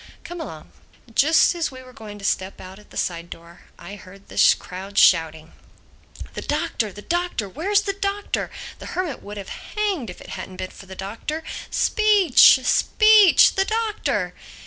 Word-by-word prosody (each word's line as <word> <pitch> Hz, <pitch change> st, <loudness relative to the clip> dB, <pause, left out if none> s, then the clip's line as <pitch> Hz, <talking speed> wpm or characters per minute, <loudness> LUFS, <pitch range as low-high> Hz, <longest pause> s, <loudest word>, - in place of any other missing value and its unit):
Come 350 Hz, -1 st, -7 dB
along." 160 Hz, -, -9 dB, 0.4 s
Just 315 Hz, +9 st, +4 dB
as 340 Hz, -2 st, -2 dB
we 260 Hz, -1 st, -12 dB
were 255 Hz, 0 st, -15 dB
going 215 Hz, -3 st, -10 dB
to 200 Hz, -, -9 dB
step 190 Hz, -1 st, -2 dB
out 190 Hz, +1 st, -11 dB
at 210 Hz, -, -20 dB
a -, -, -10 dB
side 170 Hz, -1 st, -3 dB
door 170 Hz, +1 st, -13 dB
I 195 Hz, +4 st, -10 dB
heard 195 Hz, +1 st, -16 dB
the -, -, +4 dB
crowd 195 Hz, +2 st, -9 dB
shouting, 160 Hz, -2 st, +3 dB, 0.8 s
"The -, -, -6 dB
Doctor! 215 Hz, -3 st, -2 dB
The 205 Hz, +2 st, -12 dB
Doctor! 350 Hz, -, -2 dB
Where's 380 Hz, -, 0 dB
the 400 Hz, -1 st, -3 dB
Doctor? 400 Hz, +1 st, -3 dB, 0.3 s
The -, -, -9 dB
Hermit 355 Hz, -8 st, -3 dB
would 205 Hz, +1 st, -9 dB
have 195 Hz, -1 st, -8 dB, 0.3 s
hanged 390 Hz, -, -1 dB
if 180 Hz, -, -10 dB
it -, -, -13 dB
hadn't 185 Hz, -, -8 dB
been 185 Hz, -, -6 dB
for 195 Hz, -, -14 dB
the 190 Hz, -, -10 dB
Doctor. 225 Hz, +12 st, -6 dB, 0.3 s
Speech! 405 Hz, -, +5 dB
Speech!—The 420 Hz, -, +5 dB
Doctor!" 440 Hz, 0 st, -2 dB
225 Hz, 170 wpm, -22 LUFS, -, 0.8 s, Speech